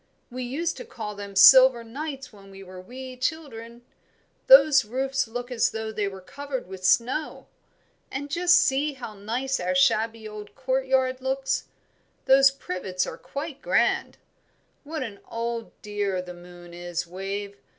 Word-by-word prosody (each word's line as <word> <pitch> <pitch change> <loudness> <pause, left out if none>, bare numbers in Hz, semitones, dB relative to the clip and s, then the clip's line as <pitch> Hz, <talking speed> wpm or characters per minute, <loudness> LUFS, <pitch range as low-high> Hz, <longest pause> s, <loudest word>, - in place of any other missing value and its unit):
"We 255 +1 -5
used 295 +8 -2
to - - -7
call 225 - -7
them 200 -1 -9
silver 255 +3 +8
nights 270 +2 -7
when 195 -1 -15
we 195 0 -12
were 185 -1 -11
wee 255 +6 -9
children. 245 -4 -5 0.6
Those 275 0 +8
roofs 265 +4 -1
look 245 +2 -6
as 235 -3 +2
though 220 0 -5
they 210 -2 -2
were 190 -1 -7
covered 275 +6 -6
with 190 0 -10
snow. 250 +10 +1 0.6
And 285 +1 -6
just 355 +2 +4
see 285 +3 +2
how 245 -5 -8
nice 240 +7 -2
our 275 - -1
shabby 225 -4 +2
old 210 -1 -10
courtyard 260 -1 0
looks; 270 0 -1 0.6
those 270 +1 +7
privets 185 -8 -4
are - - -6
quite 285 0 -7
grand. - - +1 0.7
What 310 -1 -4
an 210 -5 -8
old 230 0 -4
dear 205 -3 -2
the 180 0 -7
moon 175 0 -13
is, 175 -1 -4
Wave! 195 +3 -6
240 Hz, 150 wpm, -25 LUFS, 200-270 Hz, 0.7 s, silver